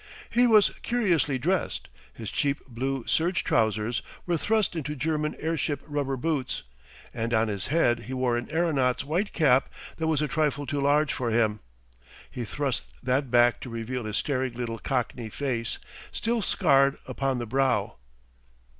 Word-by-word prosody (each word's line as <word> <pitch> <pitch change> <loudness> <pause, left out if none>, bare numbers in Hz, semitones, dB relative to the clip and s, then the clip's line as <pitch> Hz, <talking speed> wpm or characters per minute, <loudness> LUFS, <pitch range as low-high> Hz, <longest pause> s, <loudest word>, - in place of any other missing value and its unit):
He 245 +1 +4
was 215 -3 +6
curiously 175 - +1
dressed. 180 +9 -1 0.2
His 110 -3 -7
cheap 140 -1 -1
blue 130 +1 -3
serge 170 +3 +1
trousers 110 +1 +1 0.2
were 175 - +1
thrust 210 +3 +1
into 150 -2 -3
German 150 +1 -1
airship 160 -3 -1
rubber 145 -3 -2
boots, 140 - -2 0.5
and 115 +1 -1
on 110 0 +2
his 100 -2 -3
head 125 -6 +3
he 130 - -5
wore 125 -2 +1
an 120 0 -3
aeronaut's 145 -6 +1
white 175 +8 0
cap 135 -6 +3 0.3
that 160 - -1
was 160 -3 +2
a - - +1
trifle 145 0 0
too 145 0 -2
large 145 +2 +3
for 120 -2 -2
him. 110 -2 +2 0.7
He 120 - -4
thrust 140 +3 -3
that 130 +1 +1
back 120 0 +4
to 125 - -7
reveal 115 +1 -4
his 105 0 -2
staring 130 -4 -1
little 115 -2 -4
Cockney 125 -3 -2
face, 120 -3 -2 0.3
still 230 0 -1
scarred 140 -6 +3
upon 135 -2 -1
the 120 - -3
brow. 125 - +1
135 Hz, 160 wpm, -27 LUFS, 120-155 Hz, 0.7 s, was